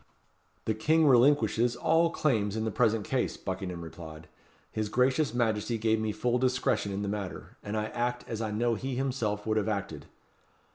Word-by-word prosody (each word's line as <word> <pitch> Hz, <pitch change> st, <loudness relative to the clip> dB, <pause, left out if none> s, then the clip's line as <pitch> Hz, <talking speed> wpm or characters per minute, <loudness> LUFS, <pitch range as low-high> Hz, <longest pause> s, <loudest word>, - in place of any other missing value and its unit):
"The 110 Hz, -, +1 dB
King 155 Hz, +9 st, +3 dB
relinquishes 125 Hz, -3 st, +4 dB
all 165 Hz, +7 st, +3 dB
claims 110 Hz, -11 st, 0 dB
in 110 Hz, -, -1 dB
the 110 Hz, -, -1 dB
present 115 Hz, -1 st, +1 dB
case," 130 Hz, -2 st, -1 dB
Buckingham 95 Hz, -2 st, -5 dB
replied. 80 Hz, -1 st, -10 dB, 0.4 s
"His 110 Hz, -1 st, -2 dB
gracious 130 Hz, +5 st, +2 dB
Majesty 115 Hz, -1 st, 0 dB
gave 110 Hz, 0 st, +1 dB
me 110 Hz, -1 st, -1 dB
full 120 Hz, +3 st, 0 dB
discretion 125 Hz, -5 st, +1 dB
in 100 Hz, +1 st, -3 dB
the -, -, -2 dB
matter, 100 Hz, -2 st, -5 dB
and 105 Hz, +1 st, -4 dB
I 105 Hz, -, 0 dB
act 120 Hz, +2 st, -2 dB
as 115 Hz, -1 st, -4 dB
I 110 Hz, -, -2 dB
know 115 Hz, +3 st, +1 dB
he 130 Hz, +4 st, -3 dB
himself 120 Hz, -6 st, -2 dB
would 110 Hz, 0 st, +1 dB
have 110 Hz, 0 st, 0 dB
acted." 95 Hz, -8 st, -4 dB
110 Hz, 180 wpm, -29 LUFS, 105-125 Hz, 0.4 s, relinquishes